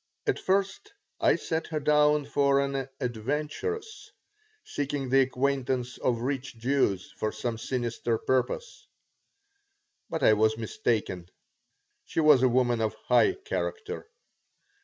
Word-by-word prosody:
At - - 0
first 195 - -1 0.3
I - - +4
set 160 0 -3
her 155 -2 -2
down 150 0 +3
for 140 0 +2
an 140 -1 -2
adventuress 150 - -3 0.6
seeking 140 -2 -3
the 135 +1 +5
acquaintance 130 -1 -1
of 120 -2 0
rich 135 -1 -3
Jews 115 -6 0
for 110 - -1
some 115 -2 -4
sinister 120 -2 -2
purpose. 130 - -2 1.2
But 160 -4 -3
I 110 - +7
was 110 +1 +2
mistaken. 105 -5 -2 0.7
She - - -3
was 150 -4 +6
a 130 - +5
woman 120 -1 +2
of 110 -1 -1
high 125 - +5
character. 445 +1 -4
135 Hz, 120 wpm, -28 LUFS, 120-150 Hz, 1.2 s, I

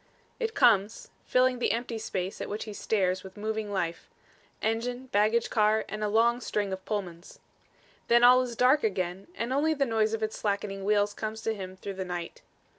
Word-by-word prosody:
It 455 -2 -2
comes 215 -3 +3
filling 255 0 +2
the - - +1
empty 235 -1 -3
space 190 -3 -4
at - - -4
which 210 +1 -3
he 215 - -7
stares 185 -3 0
with 190 0 -12
moving 215 0 -3
life 170 -4 -3 0.5
engine, 245 +3 -2
baggage 215 +3 +2
car 215 -1 +3
and 215 +1 -5
a - - +1
long 235 +3 +3
string 205 -4 -2
of 190 0 -6
Pullmans. 185 -5 -5 0.7
Then 235 +1 +5
all 250 +1 +8
is 245 -2 -4
dark 255 +5 +4
again 185 -3 -2
and 235 +3 -2
only 310 +3 +2
the 275 -1 +1
noise 220 -2 +1
of 220 - -5
its 220 - -3
slackening 200 -1 -2
wheels 205 0 +2
comes 220 +1 -5
to 225 - 0
him 185 -3 -7
through 200 +1 -6
the 190 0 -4
night. 175 -2 -6
215 Hz, 190 wpm, -28 LUFS, 195-235 Hz, 0.7 s, all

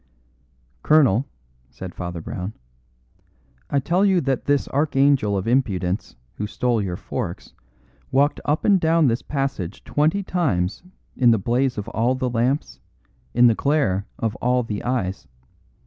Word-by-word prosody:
"Colonel," 135 -5 +4 0.4
said 95 -1 -9
Father 85 -2 -5
Brown, 90 +5 -5 1.2
"I 140 - +1
tell 170 +8 +1
you 190 -3 +4
that 135 -2 -1
this 145 -1 +1
archangel 135 -7 +2
of 95 - -3
impudence 100 -7 0 0.2
who 105 - -3
stole 120 +1 0
your 90 -3 -3
forks - - -5 0.6
walked 140 +3 +2
up 150 +2 0
and 200 -3 +5
down 165 0 +3
this 115 +1 -1
passage 135 - -3
twenty 160 +7 +1
times 105 - -1 0.3
in 125 -2 +4
the 115 - +5
blaze 120 +5 0
of 105 +1 -4
all 120 +3 +1
the 130 -1 -2
lamps, 125 +5 -1 0.6
in 120 +1 +6
the 120 - +6
glare 120 -7 0
of 110 -2 -2
all 125 +1 +1
the 105 -3 -5
eyes. 105 -7 -2
125 Hz, 145 wpm, -22 LUFS, 105-145 Hz, 1.2 s, in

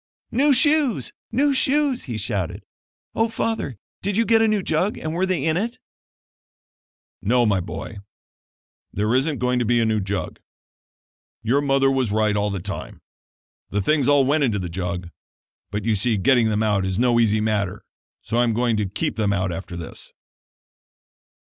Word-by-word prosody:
"New 280 +5 +3
shoes! 290 -1 +2 0.2
new 285 +2 +2
shoes!" 275 -1 +2
he 120 -6 -4
shouted. 100 -4 -3 0.5
"Oh, 225 +1 +1
Father, 225 - -2 0.2
did 200 +1 -1
you 230 - +3
get 225 0 +4
a 225 - +4
new 210 -3 +1
jug 180 +6 0
and 155 - -4
were 185 +3 0
they 175 -7 -1
in 160 0 +1
it?" 235 +6 -2 1.4
"No, 120 +4 +2
my 100 -3 +2
boy, 100 +3 -7 0.9
there 105 +3 0
isn't 135 +3 +1
going 125 0 0
to 120 - 0
be 120 +2 +2
a 115 - +2
new 110 -1 +1
jug. 100 0 -4 1.0
Your 130 +6 +2
mother 135 -1 +2
was 130 -5 0
right 105 0 +1
all 105 0 0
the 100 -2 -3
time 100 +3 -7 0.7
the 105 - -1
things 140 +6 +1
all 145 -2 +4
went 145 +2 +2
into 115 -6 +1
the 90 -3 -4
jug; 90 0 -4 0.6
but 105 0 -4
you 115 -2 +2
see 110 +2 +1
getting 115 +3 +3
them 110 0 0
out 105 -3 +1
is 95 -1 -2
no 120 0 +3
easy 110 -2 +3
matter 105 -3 -1 0.4
so 115 - -2
I - - +4
am 115 -2 +1
going 120 -1 +1
to 105 -3 -1
keep 100 - -3
them 105 -2 +1
out 95 -2 0
after 85 0 -6
this." 85 - -9
120 Hz, 180 wpm, -22 LUFS, 105-160 Hz, 1.4 s, get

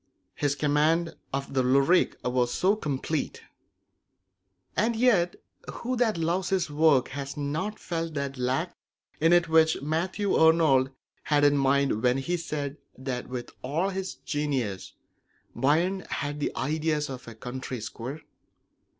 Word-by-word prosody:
His 145 -1 0
command 155 +4 +2 0.2
of 140 0 -3
the 130 - +3
lyric 140 +8 +3
form 125 - -1
was 125 +6 0 0.2
complete. 150 +1 -2 1.3
And 225 +3 +2
yet 215 -8 +3 0.4
who 255 +2 -3
that 235 -5 +1
loves 170 +3 0
his 180 -5 0
work 145 -4 +4
has 140 0 -6
not 155 +9 -2
felt 165 -2 -4
that 140 -1 -2
lack 130 +7 -1 0.4
in 165 +2 +4
it 175 -1 +5
which 160 0 +4
Matthew 180 +7 -1
Arnold 160 -5 +5 0.4
had 145 -1 +3
in 145 0 +5
mind 140 -4 +2
when 125 +1 +3
he 155 +7 -1
said 150 -4 -4 0.2
that 130 -1 -4
with 125 -1 -5
all 160 +9 0
his 190 0 -4
genius 135 - -3 0.6
Byron 165 +9 +2
had 145 +1 -3
the 145 - -1
ideas 155 +1 0
of 130 -3 -8
a 115 - -9
country 125 +2 -6
squire? 125 +7 -6
150 Hz, 140 wpm, -27 LUFS, 135-170 Hz, 1.3 s, it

